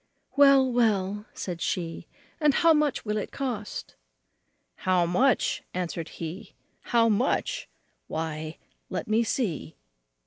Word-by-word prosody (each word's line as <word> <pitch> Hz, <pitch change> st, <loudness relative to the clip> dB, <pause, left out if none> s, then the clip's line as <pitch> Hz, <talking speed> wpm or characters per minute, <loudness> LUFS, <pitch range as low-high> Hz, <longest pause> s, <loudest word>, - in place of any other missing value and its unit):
"Well, 275 Hz, -2 st, +6 dB
well," 210 Hz, -3 st, +1 dB
said 175 Hz, -3 st, -5 dB
she, 170 Hz, -1 st, -2 dB, 0.3 s
"and 300 Hz, -3 st, +4 dB
how 335 Hz, -1 st, +6 dB
much 300 Hz, -5 st, +1 dB
will 210 Hz, 0 st, -1 dB
it 210 Hz, -, -3 dB
cost?" 240 Hz, -7 st, -4 dB, 0.8 s
"How 185 Hz, -2 st, +2 dB
much!" 245 Hz, +10 st, +2 dB
answered 170 Hz, -2 st, -3 dB
he, 165 Hz, +3 st, -7 dB, 0.3 s
"How 230 Hz, -1 st, +4 dB
much! 225 Hz, +4 st, 0 dB, 0.4 s
why, 155 Hz, 0 st, -4 dB, 0.3 s
let 185 Hz, -, -3 dB
me 215 Hz, +2 st, +3 dB
see." 200 Hz, -, -2 dB
210 Hz, 115 wpm, -27 LUFS, 175-255 Hz, 0.8 s, Well